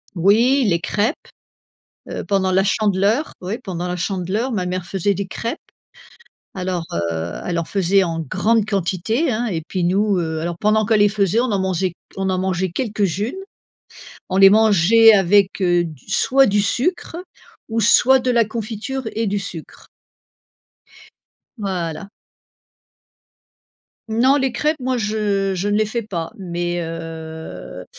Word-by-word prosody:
Oui 230 +10 +3
les 170 -3 +2
crêpes! 210 - 0 1.0
Heu, - - -5
pendant 195 -2 +1
la 190 +1 +3
Chandeleur, 205 +6 +1
oui, 190 +5 -4
pendant 180 -2 -4
la 180 - -3
Chandeleur, 195 +7 -2
ma 195 -6 -2
mère 180 0 -3
faisait 195 +2 0
des 195 0 -4
crêpes. 230 - -4 1.0
Alors, 180 -3 -3
heu, 85 0 -2
elle 175 -1 -2
en 170 - -1
faisait 195 +2 +2
en 165 -2 -3
grande 205 - +1
quantité 200 - -1
hein, 235 +2 -1
et 175 -8 -2
puis 185 - -2
nous, 195 +2 +2
heu, 160 -2 -2
alors, 170 +1 -3
pendant 215 +1 +2
qu'elle 215 0 +3
les 205 - +6
faisait, 200 +1 +1
on 250 0 0
en 200 - +1
mangeait 185 -1 -1 0.2
on 195 0 -1
en 185 - 0
mangeait 185 0 -1
quelques-unes. 205 0 -2 0.9
On 185 - -2
les 195 0 +8
mangeait 220 +1 +6
avec, 195 +1 +3
heu, 175 -1 +3
du 155 -6 -10
soit 270 +7 +3
du 205 +1 +2
sucre 305 - -1 0.5
ou 225 0 -1
soit 255 +4 +5
de 255 0 -1
la 235 -2 +3
confiture 225 +4 -5
et 225 +1 -1
du 205 0 0
sucre 180 -5 -8 1.7
voilà. 190 -3 -4 2.0
Non, 250 +6 +3
les 265 -2 0
crêpes 300 +5 0
moi 255 0 -1
je 210 -3 -1
je 190 +2 -2
ne 205 - +1
les 215 - +2
fais 230 +3 -3
pas. 175 -7 -5
Mais, 175 -1 -3
heu, 160 - -7
195 Hz, 150 wpm, -20 LUFS, 175-220 Hz, 2.0 s, les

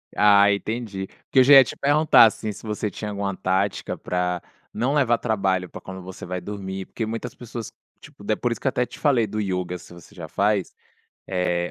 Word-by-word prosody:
Ah, 100 -1 +6
entendi. 100 -2 -3 0.2
Porque 130 -1 +4
já 140 +2 +6
ia 135 - +10
te - - -7
perguntar, 145 -2 +6
assim, 110 -1 -1
se - - -11
você 105 0 -2
tinha 105 +3 -6
alguma 100 -1 -3
tática 95 +2 -1
pra 90 -1 -2 0.3
não 125 +6 0
levar 125 -5 +3
trabalho 95 -5 0
pra - - -9
quando 95 0 -8
você 90 +1 -9
vai 90 0 -4
dormir, 95 -1 -6
porque 110 - -4
muitas 115 +2 -5
pessoas, 115 -2 -8 0.3
tipo, 100 - -15
é 110 - +3
por 120 +2 -2
isso 115 - -3
que - - -2
eu - - +5
até 125 -1 0
te - - -13
falei 130 -7 +3
do 105 +2 -4
ioga, 90 -2 -2
se 90 - -14
você 85 +4 -15
já 85 -4 -8
faz, 100 +2 0 0.5
eh, 90 -2 -1
100 Hz, 210 wpm, -23 LUFS, 95-115 Hz, 0.5 s, ia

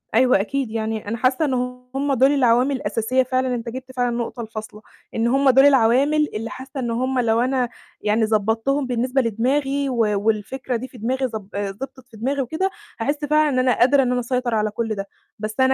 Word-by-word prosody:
أيوه 250 -4 +5
أكيد، 265 +1 -2
يعني 220 -2 -3
أنا 230 +2 -2
حاسّة 255 +5 +2
إن 265 - 0 0.4
هم 280 0 0
دُول 265 +2 +4
العوامل 255 0 +3
الأساسية 230 +2 0
فعلًا، 255 0 0
أنت 235 0 -5
جِبت 260 +2 -8
فعلًا 245 -1 0
النقطة 235 0 -3
الفاصلة، 215 -1 -8 0.3
إن 230 +1 +1
هم 270 +2 +3
دُول 270 +2 +6
العوامل 280 +3 +4
اللي 225 +1 -3
حاسّة 265 +2 -8
إن 240 -2 -2
هم 255 +2 0
لو 230 -2 +2
أنا 255 -1 +1 0.3
يعني 215 +1 +2
ضبّطتهم 225 +6 0
بالنسبة 250 +2 +1
لدماغي 270 +5 0
و 255 - -2 0.3
والفكرة 225 +5 -1
دي 245 +3 -4
في 255 - -15
دماغي، 255 +4 -1
ضب 220 -5 -6
آآ 200 -1 -2
ضبطت 260 +4 -9
في 220 - -14
دماغي 270 +5 -1
وكده، 315 +9 -1 0.3
هاحس 290 +5 -1
فعلًا 305 +1 +3
إن 255 -2 +1
أنا 255 -1 +2
قادرة 270 +3 +5
إن 250 - 0
أنا 250 - +1
أسيطر 245 -1 -1
على 215 0 0
كل 220 0 -2
ده. 195 0 -5 0.3
بس 215 0 -4
أنا 260 0 +5
250 Hz, 205 wpm, -22 LUFS, 225-270 Hz, 0.4 s, دُول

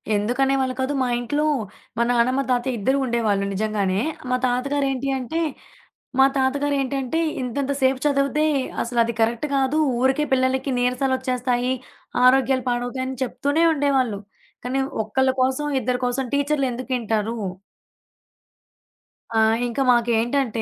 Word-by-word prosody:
ఎందుకనేవాళ్ళు 260 +4 +1
కాదు. 270 +2 -1
మా - - 0
ఇంట్లో 290 +5 -1 0.5
మా 235 - +3
నాన్నమ్మ, 250 +3 +2
తాతయ 245 0 0
ఇద్దరూ 265 +7 +1
ఉండేవాళ్ళు 220 -5 0
నిజంగానే. 200 -1 0 0.3
మా 255 - +3
తాతగారు 275 +3 0
ఏంటి 270 +1 -2
అంటే 320 +7 -3 0.8
మా 265 - +8
తాతగారు 280 +2 +1
ఏంటంటే, 270 +4 -1 0.2
ఇంతంత 275 +3 -2
సేపు 260 0 +2
చదివితే, 285 +1 +2 0.4
అసలు 235 0 -4
అది 235 +1 -1
కరెక్ట్ 230 +5 +1
కాదు. 270 +3 +1 0.2
ఊరికే 265 +3 +2
పిల్లలకి 260 +1 +1
నీరసలొచ్చేస్తాయి. 250 -1 0 0.5
ఆరోగ్యాలు 265 0 +4
పాడవుతాయని 255 +2 -2
చెప్తూనే 285 +5 0
ఉండేవాళ్ళు. 270 -7 +1 0.5
కానీ 265 +2 -1 0.2
ఒక్కళ్ళ 260 +5 +1
కోసం, 265 +3 0
ఇద్దరి 250 +1 -1
కోసం 255 +2 -1
టీచర్లు 285 -1 +1
ఎందుకింటారు? 235 -3 -2 2.0
ఆ! - - +3 0.3
ఇంకా 240 +3 -2
మాకేంటంటే, 235 0 +1
260 Hz, 120 wpm, -22 LUFS, 240-275 Hz, 2.0 s, మా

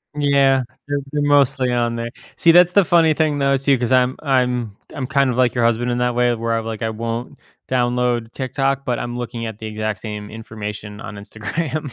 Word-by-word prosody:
Yeah. 140 -2 +3 0.2
They're 145 0 -1
they're 150 -1 -1
mostly 140 -3 +3
on 120 -1 0
there. 115 0 -3 0.3
See, 165 - +5
that's 175 +1 +6
the 200 -3 +5
funny 165 -2 +4
thing, 150 -3 +1
though, 140 0 +3
too, 135 0 +2
'cause 120 0 -1
I'm 130 0 +3
I'm 125 -6 0 0.2
I'm 130 -2 -4
kind 140 -3 +2
of 120 - -4
like 130 0 +2
your 120 - +1
husband 120 +1 +1
in 120 - 0
that 125 0 +1
way 120 -1 +2
where 115 0 -1
I'm 115 - -4
like, 110 -1 -5
I 110 - 0
won't 115 +2 -5 0.3
download 120 -2 0
TikTok, 135 +1 -1
but 120 -1 -1
I'm 120 0 -4
looking 120 -1 -5
at 110 -2 -7
the 110 - -8
exact 110 -1 -3
same 105 -1 -6
information 105 -1 -7
on 105 - -8
Instagram. 140 +8 -4
125 Hz, 210 wpm, -20 LUFS, 115-140 Hz, 0.3 s, that's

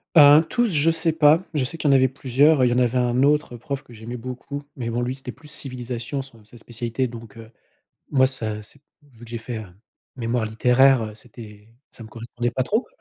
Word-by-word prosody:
Heu, 150 +1 +8
tous, 240 -1 +1
je 160 0 +3
sais 165 0 +1
pas, 160 +2 +4
je 145 - +1
sais 165 +6 -6
qu'il 150 - +1
y - - +5
en - - +6
avait 130 0 +5
plusieurs, 135 +2 +2
il 125 - +4
y - - +1
en - - 0
avait 125 0 +2
un 125 +1 +1
autre 145 -4 +1
prof 140 +2 -5
que 120 - -16
j'aimais 115 +2 -8
beaucoup, 130 +4 -7
mais 115 -3 -4
bon, 120 +1 -1
lui 125 +1 -2
c'était 135 -2 -6
plus 150 +4 -17
civilisation, 125 -2 -5
son 115 -5 -14
sa 120 - -16
spécialité, 120 +2 -3
donc 115 -2 -11
heu, 115 -1 -11 0.6
moi 130 -2 +5
ça, 110 -5 -5
c'est 120 +6 -17 0.2
vu 120 -5 -17
que 115 - -14
j'ai 120 - -4
fait, 115 +1 -6
heu, 110 - -7 0.5
mémoire 120 -1 -1
littéraire, 125 +1 +3
c'était 110 -2 -14 0.2
ça 115 - -9
me - - -11
correspondait 120 +2 -4
pas 130 - 0
trop. 220 - -1
125 Hz, 225 wpm, -23 LUFS, 115-140 Hz, 0.6 s, Heu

